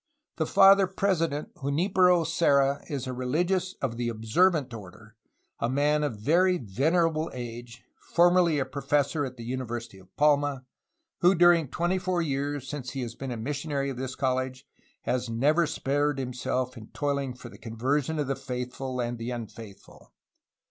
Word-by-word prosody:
"The - - 0
Father 195 0 +6
President 165 -6 -1
Junlpero 175 +4 +2
Serra 140 -4 +2
is 140 -3 -3
a 130 - -4
religious 175 +9 -1
of 115 -4 -2
the 120 -1 -1
Observant 130 +6 +1
order/ 105 +1 -11 0.4
a 115 - 0
man 145 +3 +2
of 135 -7 -2
very 180 - +3
venerable 160 - +1
age, 120 -1 -8 0.3
formerly 175 -4 +4
professor 145 +2 0
at 130 -1 -8
the 115 - -8
University 120 -4 -5
of 95 -1 -19
Palma, 145 -2 +2 0.5
who 180 +2 +5
during 175 -3 +5
twenty 175 +7 -1
four 180 -1 -1
years, 140 -2 -2
since 130 -5 -5
he 135 - -3
has 120 -1 -5
been 135 +2 -6
a 120 - -4
missionary 140 +3 -2
of 130 - -7
this 130 0 -4
college, 130 0 -2 0.4
has 125 -1 -1
never 150 +8 +2
spared 145 0 0
him 125 -1 -4
self 125 +1 -2
in 110 -3 -10
toiling 140 -3 -2
for 120 -1 -10
the - - -14
conversion 130 +7 -1
of 150 - 0
the 135 +1 -1
faithful 125 0 -5
and 120 -1 -2
the 115 +1 -4
unfaith 110 -4 -7
ful. - - -19
135 Hz, 160 wpm, -27 LUFS, 125-160 Hz, 0.5 s, Father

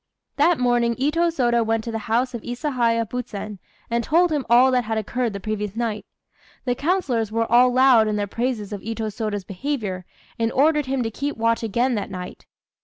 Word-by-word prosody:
That 345 -1 +4
morning 240 -1 +2
Itô 300 +7 +1
Sôda 240 -6 +2
went 225 0 0
to 230 - -5
the 225 -1 -5
house 250 +3 +1
of 235 - -5
Isahaya 240 -3 0
Buzen, 210 -4 -6 0.3
and 235 0 -1
told 340 +6 +3
him 295 -4 -1
all 250 +2 +6
that 250 -2 +1
had 220 0 -2
occurred 235 +2 -1
the 200 - -5
previous 210 0 -4
night. 225 -3 -3 0.6
The 250 - +1
councillors 265 - 0
were 230 +1 +1
all 250 +1 +6
loud 255 -3 +5
in 210 - 0
their 205 -1 -1
praises 220 -1 -3
of 200 - -5
Itô 220 0 -4
Sôda's 215 -3 -3
behaviour, 195 -3 -4 0.3
and 225 0 +1
ordered 300 +1 +3
him 265 -1 0
to 225 - -3
keep 280 +5 -4
watch 230 0 +1
again 240 +4 0
that 210 -3 -3
night. 180 -1 -8
235 Hz, 195 wpm, -23 LUFS, 220-255 Hz, 0.6 s, all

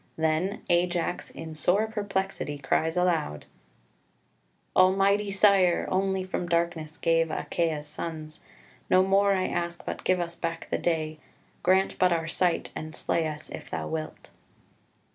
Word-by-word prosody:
Then 160 +5 0
Ajax 175 0 0
in 160 -1 -8
sore 180 +7 +2
perplexity 195 -8 -3
cries 160 +4 0
aloud 165 - 0 1.3
"Almighty 195 +2 +4
Sire, 195 -3 +4
Only 190 0 +1
from 180 -1 -4
darkness 170 -2 -1
save 165 -1 +3
Achaia's 155 -1 -1
sons; 155 0 -6 0.5
No 185 0 +5
more 200 +1 +3
I 185 -1 +1
ask, 170 0 -3
but - - -5
give 185 -1 +2
us 170 -1 -2
back 165 -1 -4
the - - 0
day; 155 -2 -1 0.4
Grant 190 +1 +2
but 185 -1 +4
our 165 -2 0
sight, 175 +1 0
and 155 0 -6
slay 165 -1 +1
us, 155 0 -7
if - - -8
thou - - -3
wilt." 160 -1 -6
175 Hz, 140 wpm, -27 LUFS, 160-190 Hz, 1.3 s, No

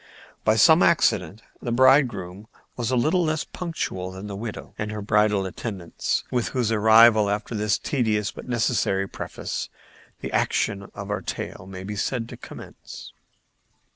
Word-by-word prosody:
By 110 - +3
some 160 - +6
accident 105 - +2 0.2
the 120 - -3
bridegroom 120 -7 +3 0.3
was 120 -2 -2
a 130 - +1
little 155 +9 +2
less 155 -1 0
punctual 155 - -4
than 95 +2 -8
the 100 -1 -6
widow 110 +1 -7
and 105 0 -3
her 105 - -4
bridal 105 -1 +2
attendants, 95 -2 -3
with 120 -2 0
whose 125 -4 -1
arrival, 110 0 +6
after 105 +3 -3
this 105 -2 +1
tedious 110 -6 0
but - - -11
necessary 110 -5 +1
preface, - - -5 0.5
the - - -5
action 100 -1 0
of 100 0 -6
our 105 - -2
tale 95 - -6
may 95 -1 -8
be 105 +2 -5
said 115 +3 -2
to - - -8
commence. - - -11
105 Hz, 155 wpm, -24 LUFS, 100-120 Hz, 0.5 s, some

